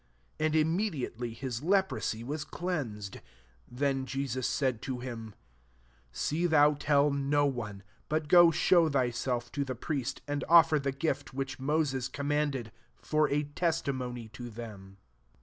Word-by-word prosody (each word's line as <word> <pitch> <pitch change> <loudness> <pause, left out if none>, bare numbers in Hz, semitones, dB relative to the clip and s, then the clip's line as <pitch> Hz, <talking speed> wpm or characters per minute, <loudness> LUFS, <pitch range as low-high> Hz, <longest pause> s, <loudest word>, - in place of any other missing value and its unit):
And 155 0 +1
immediately 155 - 0
his 120 0 -5
le* 190 +5 +4
prosy 115 - -4
ws^ 145 +3 -3
cleansed. 120 - -4
4 - - -14 0.5
Then 135 +1 -1
Je 135 +1 -2
sus 130 -1 -2
said 130 -5 0
to 130 -2 -3
him, 115 -4 -7 0.4
<< - - -34 0.3
See 150 - 0
thou 150 -2 +5
tell 145 0 +2
no 140 +1 +2
one; 105 -8 -3 0.3
but 155 0 0
go 175 +1 +8
show 165 0 +4
thyself 120 -2 -1
ta 145 - -2
the 130 -2 -4
priest, 135 0 -3
and 145 0 -2
offer 165 -2 +7
the 140 0 -1
gift 140 -1 -3
which 135 0 -3
Moses 135 -2 0
commanded; 140 -4 -1 0.3
for 155 0 +1
a 145 +1 +1
testimony 140 -7 -2
to 120 +2 -8
them.' 105 -4 -9
140 Hz, 150 wpm, -30 LUFS, 120-150 Hz, 0.5 s, go